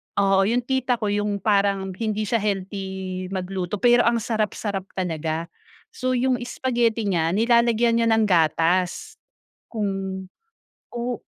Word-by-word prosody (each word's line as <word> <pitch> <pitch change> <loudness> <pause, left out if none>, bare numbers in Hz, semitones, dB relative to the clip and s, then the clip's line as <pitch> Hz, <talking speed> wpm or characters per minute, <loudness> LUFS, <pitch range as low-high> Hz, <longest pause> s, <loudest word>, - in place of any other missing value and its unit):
oo 195 -1 +3
yung 240 +3 +1
tita 255 -1 0
ko 210 -3 -2
yung 205 -1 -1
parang 200 -2 +1
hindi 215 +2 -2
siya 225 +2 0
healthy 190 -2 -3
magluto 185 0 -3
pero 240 0 +5
ang 235 0 +2
sarap-sarap 210 -3 -2
talaga. 165 -2 -3 0.5
So, 255 0 -1
yung 255 +1 +2
spaghetti 235 -3 0
niya 165 -2 +1
nilalagyan 235 +2 +3
niya 230 - +2
ng 225 0 +4
gatas, 175 +1 +1 0.6
kung 215 -3 -1 1.1
o 240 0 -3
205 Hz, 125 wpm, -23 LUFS, 190-235 Hz, 1.1 s, pero